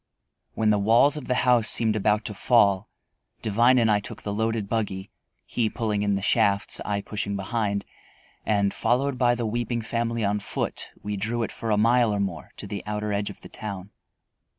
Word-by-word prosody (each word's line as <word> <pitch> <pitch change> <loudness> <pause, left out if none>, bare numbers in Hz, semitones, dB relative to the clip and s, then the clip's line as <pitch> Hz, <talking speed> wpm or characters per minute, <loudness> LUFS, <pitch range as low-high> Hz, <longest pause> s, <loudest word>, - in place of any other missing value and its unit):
When 110 -1 +2
the 105 - +2
walls 115 +8 +4
of 150 - -6
the 125 - +1
house 120 -3 +5
seemed 110 -2 +3
about 105 +1 +1
to 105 - -2
fall, 100 -3 +3 0.5
Devine 120 +4 +4
and 115 -3 +3
I 105 - +3
took 100 - -8
the 100 - -3
loaded 110 -1 -1
buggy, 100 -3 -3 0.3
he 115 -3 0
pulling 105 -3 -2
in 100 -1 +1
the 100 - -3
shafts, 100 0 +2
I 100 -1 -2
pushing 100 -1 -4
behind, 100 0 -2 0.6
and, 100 -2 +1
followed 125 +3 0
by 120 -1 +3
the 120 -1 -3
weeping 120 +1 -2
family 115 0 -1
on 105 +1 0
foot, 100 - -3
we 105 0 -3
drew 115 +4 -1
it - - -4
for 115 - -5
a 105 - +2
mile 115 +1 +4
or 100 - -1
more 95 -5 -3
to - - -6
the 100 - -5
outer 105 0 -2
edge 100 0 -1
of 100 - -11
the - - -12
town. 100 -2 -7
105 Hz, 195 wpm, -25 LUFS, 100-115 Hz, 0.6 s, house